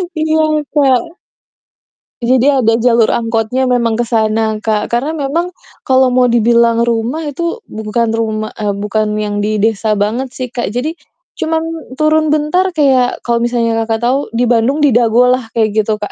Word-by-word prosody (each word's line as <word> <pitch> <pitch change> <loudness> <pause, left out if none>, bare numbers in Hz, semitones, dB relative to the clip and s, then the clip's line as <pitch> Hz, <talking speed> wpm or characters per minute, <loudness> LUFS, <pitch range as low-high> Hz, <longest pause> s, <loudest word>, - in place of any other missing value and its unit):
Iya, 315 0 +1 0.3
Kak. 270 -2 +2 1.1
Jadi 255 +3 +3
ada 235 -5 +2
jalur 235 -1 +3
angkotnya 230 +2 -1
memang 240 -3 +1
ke 240 - 0
sana, 220 -1 0
Kak. 215 -1 -2
Karena 270 +7 -1
memang, 330 +5 -2 0.3
kalau 260 -1 +3
mau 250 0 +3
dibilang 235 0 +3
rumah 235 +6 -1
itu, 340 - -4
bu 215 - -10
bukan 230 +1 0
rumah, 220 -1 -2
eee, 205 -2 -1
bukan 210 +1 -2
yang 210 -1 -2
di 210 +1 -1
desa 215 0 0
banget 215 +6 -1
sih, 255 -2 -5
Kak. 240 -1 -3
Jadi, 265 - -4 0.4
cuman 320 0 -1 0.3
turun 310 +2 +2
bentar 310 +5 0
kayak 265 -5 +2
kalau 235 -1 0
misalnya 235 -1 0 0.2
Kakak 225 0 -2
tahu 255 +3 +2 0.2
di 240 - +1
Bandung 245 +5 +1
di 285 - +4
Dago 240 +1 +3
lah, 255 -2 -1
kayak 220 -2 +2
gitu 215 0 0
Kak. 210 -1 -6
240 Hz, 170 wpm, -14 LUFS, 220-270 Hz, 1.1 s, di